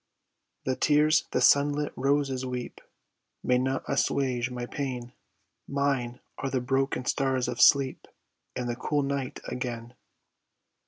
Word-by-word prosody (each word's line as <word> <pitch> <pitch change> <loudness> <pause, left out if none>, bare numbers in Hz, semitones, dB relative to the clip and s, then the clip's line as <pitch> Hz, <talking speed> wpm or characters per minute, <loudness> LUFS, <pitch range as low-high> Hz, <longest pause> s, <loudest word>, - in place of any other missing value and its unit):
The 130 - 0
tears 150 +2 +3
the - - 0
sunlit 145 +1 +4
roses 135 -1 +1
weep 125 -1 -5 0.6
May 125 0 +3
not 130 +1 -1
assuage 130 -3 0
my 125 -1 -4
pain, 125 -2 -5 0.5
Mine 135 -3 -1 0.2
are 135 - -2
the 130 - 0
broken 135 0 0
stars 130 -2 0
of 125 -1 -2
sleep 135 -2 +4 0.5
And 125 -1 -3
the 120 - -2
cool 145 +3 0
night 135 -2 -3
again. 120 -1 -5
130 Hz, 125 wpm, -28 LUFS, 125-140 Hz, 0.6 s, sunlit